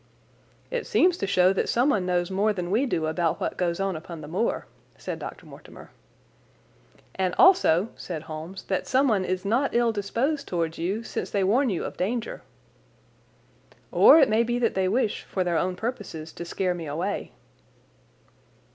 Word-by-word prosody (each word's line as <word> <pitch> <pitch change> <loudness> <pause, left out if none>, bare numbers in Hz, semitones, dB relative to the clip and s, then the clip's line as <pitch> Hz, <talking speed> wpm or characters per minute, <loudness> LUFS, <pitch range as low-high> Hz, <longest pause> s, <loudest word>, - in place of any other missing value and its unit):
"It - - -3
seems 360 -1 +3
to 195 - -1
show 185 -1 +4
that 195 - -1
someone 235 -7 +2
knows 175 0 0
more 205 +3 +1
than 180 -2 -4
we 245 +7 +2
do 165 -9 -1
about 160 +1 0
what - - -2
goes 175 -1 -1
on 195 -2 -1
upon 160 +1 -8
the 150 - -8
moor," 185 +9 -1 0.3
said - - -5
Dr. - - -8
Mortimer. - - -13 1.2
"And 185 -1 -1
also," 230 - +5
said 160 -4 -6
Holmes, 160 +4 -8
"that 190 - -2
someone 255 -7 +2
is 185 +1 -3
not 240 +7 +1
ill 235 -1 +3
disposed 240 +8 -2
towards 165 -2 -2
you, 195 +7 -2
since - - -4
they 200 -2 0
warn 245 +8 +3
you 185 - -2
of - - -7
danger." 230 +5 -2 1.5
"Or - - +8
it 275 - +6
may 220 0 +3
be 240 +1 0
that 235 -2 +1
they 190 -1 +1
wish, 215 +2 0
for 185 - -2
their 175 -2 0
own 185 0 -1
purposes, 200 -8 -5
to 170 - -7
scare 180 +1 -1
me 170 -3 -6
away." 175 +8 -3
190 Hz, 175 wpm, -26 LUFS, 175-235 Hz, 1.5 s, Or